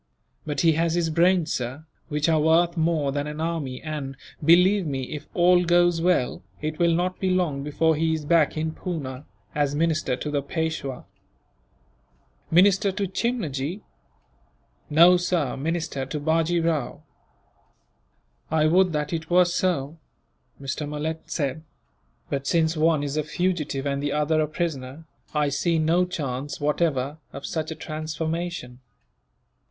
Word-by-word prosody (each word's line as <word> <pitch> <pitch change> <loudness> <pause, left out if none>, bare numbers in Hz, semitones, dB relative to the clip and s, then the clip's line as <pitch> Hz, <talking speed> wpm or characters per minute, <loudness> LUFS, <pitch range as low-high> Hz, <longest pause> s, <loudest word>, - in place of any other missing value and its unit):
"But 145 -2 -1
he 165 - +5
has 165 +1 +1
his 170 -2 0
brains, 175 +1 +3
sir, 130 +5 -4 0.2
which 150 0 0
are 160 -1 +3
worth 165 +3 +3
more 160 -4 +1
than 145 +1 -2
an 150 +1 -6
army 160 -6 -3
and, 145 -4 -5 0.3
believe 180 +4 +5
me, 135 -2 -2
if 150 +3 -7
all 180 0 +5
goes 175 -1 +3
well, 175 -8 +1 0.2
it 155 +1 -4
will 170 -1 +3
not 180 +2 -1
be 190 - 0
long 175 -7 0
before 160 +2 +1
he 160 +1 +1
is 155 -2 -5
back 160 -1 +3
in 160 +1 -1
Poona, 145 -7 -5 0.3
as 145 -1 0
minister 155 -4 +1
to 150 +4 -5
the 145 -1 0
Peishwa." 140 -3 -3 1.4
"Minister 195 +3 +4
to 200 +1 -2
Chimnajee?" 185 - -2 1.1
"No, 170 +4 +7
sir, 175 -6 0
minister 155 -2 -3
to 150 +2 -4
Bajee 165 +2 +1
Rao." 155 -7 -1 1.5
"I 155 -1 +2
would 180 +2 +4
that 150 +1 -2
it 160 -1 -4
were 180 +1 +5
so," 170 -4 -1 0.6
Mr. 140 +2 -4
Malet 155 +2 -3
said, 145 -1 -2 0.7
"but 140 -1 -3
since 165 -1 +2
one 155 -1 +2
is 145 +1 -3
a 155 - +1
fugitive 150 -4 -2
and 140 0 -1
the 145 0 -1
other 150 +1 +2
a 155 - +1
prisoner, 155 -2 -4 0.3
I 150 -1 +2
see 165 +4 +1
no 165 +3 +3
chance, 145 -5 -4
whatever, 145 -1 0
of 140 - -8
such 160 -1 -3
a 160 - -5
transformation." 155 -4 -4
160 Hz, 150 wpm, -25 LUFS, 145-170 Hz, 1.5 s, No